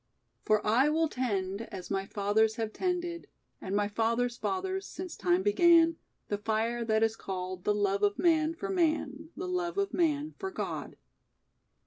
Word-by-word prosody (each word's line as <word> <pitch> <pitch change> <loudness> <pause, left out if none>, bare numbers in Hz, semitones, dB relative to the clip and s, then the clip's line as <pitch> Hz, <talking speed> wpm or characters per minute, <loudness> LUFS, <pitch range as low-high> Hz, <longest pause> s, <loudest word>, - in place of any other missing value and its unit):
"For 215 0 +1
I 245 +7 +4
will 320 +1 +2
tend 200 -7 -2
As 190 -4 -7
my 195 0 -1
fathers 215 +2 +1
have 225 -2 -3
tended 350 -2 -2 0.3
And 190 +1 -3
my 205 0 +2
fathers' 230 +3 0
fathers 380 +5 -2
Since 365 -2 -7
time 180 0 +1
began, 330 - +5 0.3
The 205 - -2
fire 225 +2 0
that 220 -1 +2
is 225 0 +1
called 185 -3 -5
The 210 - +2
love 200 -1 +1
of 205 0 +2
man 320 -1 +3
for 395 +4 -5
man, 315 -4 0
The 370 - -4
love 360 0 -2
of 395 -1 0
man 305 -3 +1
for 385 - -3
God." - - -5
235 Hz, 165 wpm, -30 LUFS, 205-335 Hz, 0.3 s, began